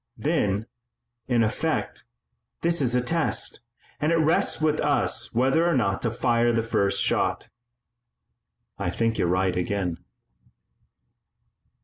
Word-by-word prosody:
"Then, 100 +2 0 0.6
in 120 -3 +2
effect, 110 - -2 0.6
this 170 -1 +2
is 125 -2 +1
a 125 - +3
test, 165 +5 0 0.4
and 150 +2 +1
it - - +3
rests 160 0 +2
with 155 -1 +1
us - - 0
whether 135 +7 +2
or 170 - +2
not 100 -6 0
to 115 - 0
fire 120 +1 +1
the 115 -1 0
first 100 -3 0
shot." - - 0 1.3
"I - - -1
think 115 +4 -1
you're - - +2
right 90 +1 +1
again." 90 -1 -2
115 Hz, 125 wpm, -25 LUFS, 100-145 Hz, 1.3 s, a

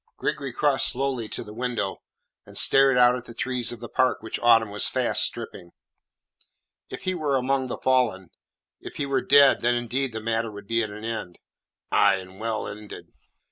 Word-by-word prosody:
Gregory 145 -3 -3
crossed 140 +2 +1
slowly 130 -4 -2
to - - -4
the 105 - -11
window, 115 -4 -3 0.4
and - - -11
stared 135 -1 +4
out 125 0 +5
at 125 -1 -7
the 115 - -11
trees 125 -1 -1
of 120 - -8
the 120 - -6
park 130 -2 0
which 110 - -4
autumn 115 -3 +4
was 105 - 0
fast - - +2
stripping. 85 - -2 1.2
"If - - -8
he 185 - -1
were 150 -5 -1
among 130 +1 0
the - - -5
fallen 120 -8 0 0.5
if - - -10
he 145 - -2
were 140 -1 0
dead 140 -1 +5
then 120 +1 +2
indeed 120 +2 -2
the 110 - -5
matter 115 +1 -1
would 105 -1 -10
be 115 +3 0
at 110 - -3
an 105 +2 -9
end." 110 -6 -5 0.5
"Aye, 100 - +4
and 95 0 -10
well 110 -1 -3
ended." 105 0 -10
120 Hz, 190 wpm, -25 LUFS, 110-130 Hz, 1.2 s, out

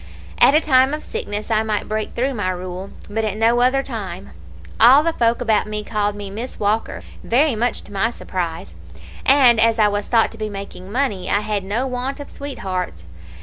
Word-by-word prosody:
At 280 - +6
a - - +7
time 270 -2 +3
of 305 - -9
sickness 210 +2 -4
I 220 -1 +3
might 215 -2 -2
break 215 0 -3
through 265 +3 0
my 205 -6 -2
rule, 185 +1 -5 0.2
but 220 +2 -2
at 210 -1 -2
no 230 +2 +3
other 265 +2 +3
time. 200 -8 -6 0.5
All 260 +6 +7
the 330 0 0
folk 235 -2 +1
about 220 -4 +1
me 210 0 -4
called 210 -1 -1
me 205 -1 -7
Miss 230 +6 -6
Walker, 210 +2 -1 0.2
very 275 +4 +2
much 235 +2 -1
to 205 - -13
my 200 +3 +1
surprise; 170 - -5 0.5
and 260 -4 +6
as 230 0 +4
I 210 -2 +4
was 205 0 -2
thought 230 -2 +3
to 225 - -12
be 215 0 -3
making 195 -1 -8
money, 235 -7 -1
I 205 - +2
had 210 -2 -2
no 215 +7 -1
want 260 +2 -3
of 285 - -9
sweethearts. 185 - -5
220 Hz, 200 wpm, -20 LUFS, 205-250 Hz, 0.5 s, a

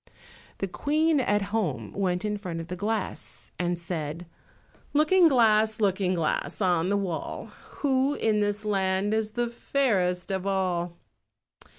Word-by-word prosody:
The 195 - -2
Queen, 305 - +1
at 205 -5 +1
home, 145 - -1
went 185 -1 -1
in 210 0 0
front 180 -5 -5
of 165 - -7
the 180 - -3
glass 210 +2 -4
and 175 0 0
said— 165 -1 -4 0.7
"Looking 330 +4 +5
glass, 220 -5 +4
Looking 190 -3 +1
glass, 165 -3 -1
on 180 -3 +2
the 200 - +2
wall, 185 -5 -4 0.3
Who 275 0 +2
in 215 -1 +1
this 205 +1 -1
land 195 0 +1
is 220 -1 -1
the 240 0 0
fairest 205 -8 0
of 190 0 -2
all?" 180 -3 -1
200 Hz, 145 wpm, -27 LUFS, 180-220 Hz, 0.7 s, Looking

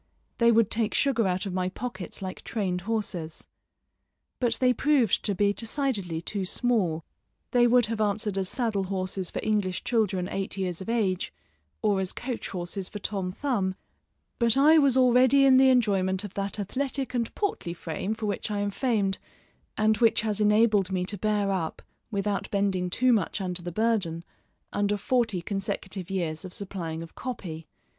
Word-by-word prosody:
They 235 0 +6
would 225 -2 +3
take 225 -1 +1
sugar 250 -7 +2
out 185 +2 -1
of 195 - -4
my 185 0 0
pockets 195 -3 -6
like 185 -1 -5
trained 185 -5 -2
horses. 180 -8 -3 0.9
But 240 -2 +2
they 255 -1 +3
proved 270 -5 +2
to 205 - +1
be 200 +2 +2
decidedly 215 - -2
too 200 +1 -3
small; 185 -6 0 0.5
they 240 -1 +5
would 245 0 +5
have 220 0 -3
answered 210 -1 0
as 190 -1 0
saddle 220 -6 0
horses 185 -1 -3
for - - -4
English 205 -4 0
children 200 -6 +1
eight 195 0 -4
years 185 -2 -2
of 190 - -6
age, 200 -6 0 0.5
or 205 -3 +3
as 185 - -1
coach 245 -1 -4
horses 180 +1 -4
for - - -6
Tom 195 -2 -3
Thumb, 195 -5 -1 0.6
but 235 0 +3
I 310 +3 +7
was 275 -3 +4
already 255 +2 +5
in 265 -1 +7
the 265 0 +6
enjoyment 195 -6 +2
of 205 -2 -7
that 200 +1 -2
athletic 265 +5 -2
and 235 -2 -1
portly 280 - -2
frame 175 +6 -3
for 220 - -5
which 205 0 -2
I 210 - -2
am 205 0 -1
famed, 205 -5 0 0.6
and 215 0 +3
which 230 -2 +4
has 215 -1 0
enabled 210 -2 +4
me 180 -1 0
to 205 +2 -3
bear 210 -1 +1
up, 175 -4 -3 0.3
without 200 -2 -2
bending 195 -3 0
too 250 +7 +3
much 210 -1 0
under 180 -2 -1
the 175 0 -5
burden, 195 -5 0 0.5
under 205 0 +1
forty 225 -4 0
consecutive 195 -2 -4
years 170 -4 -2
of 185 -1 -6
supplying 170 -5 -4
of 165 - -12
copy. 170 -11 -6
205 Hz, 175 wpm, -27 LUFS, 185-230 Hz, 0.9 s, I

